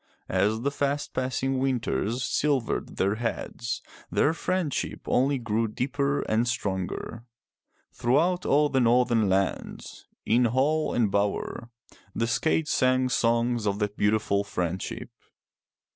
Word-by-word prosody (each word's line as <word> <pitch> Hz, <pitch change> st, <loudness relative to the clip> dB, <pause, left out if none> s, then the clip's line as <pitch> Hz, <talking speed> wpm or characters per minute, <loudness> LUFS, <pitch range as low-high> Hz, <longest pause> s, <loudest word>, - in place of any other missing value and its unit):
As 110 Hz, +3 st, +1 dB
the 140 Hz, +3 st, 0 dB
fast 140 Hz, +1 st, -2 dB
passing 130 Hz, +1 st, -1 dB
winters 120 Hz, -, -1 dB
silvered 140 Hz, -5 st, 0 dB
their 100 Hz, +3 st, +1 dB
heads, 115 Hz, 0 st, -3 dB, 0.3 s
their 155 Hz, -, +2 dB
friendship 175 Hz, -3 st, -2 dB
only 135 Hz, +2 st, +2 dB
grew 115 Hz, -2 st, -1 dB
deeper 140 Hz, +5 st, -1 dB
and 115 Hz, +2 st, 0 dB
stronger. 105 Hz, 0 st, -3 dB, 0.7 s
Throughout 170 Hz, +9 st, +1 dB
all 150 Hz, +1 st, +3 dB
the 135 Hz, -, +1 dB
Northern 120 Hz, -3 st, +3 dB
lands, 95 Hz, 0 st, -2 dB, 0.2 s
in 120 Hz, +2 st, +3 dB
hall 140 Hz, +7 st, +1 dB
and 115 Hz, -4 st, +2 dB
bower, 100 Hz, +3 st, -1 dB, 0.5 s
the 115 Hz, -, +1 dB
skalds 155 Hz, +6 st, +1 dB
sang 130 Hz, 0 st, +2 dB
songs 120 Hz, -2 st, +1 dB
of 100 Hz, 0 st, 0 dB
that 105 Hz, -1 st, -2 dB
beautiful 105 Hz, -1 st, +1 dB
friendship. 95 Hz, -3 st, -4 dB
120 Hz, 120 wpm, -27 LUFS, 110-135 Hz, 0.7 s, all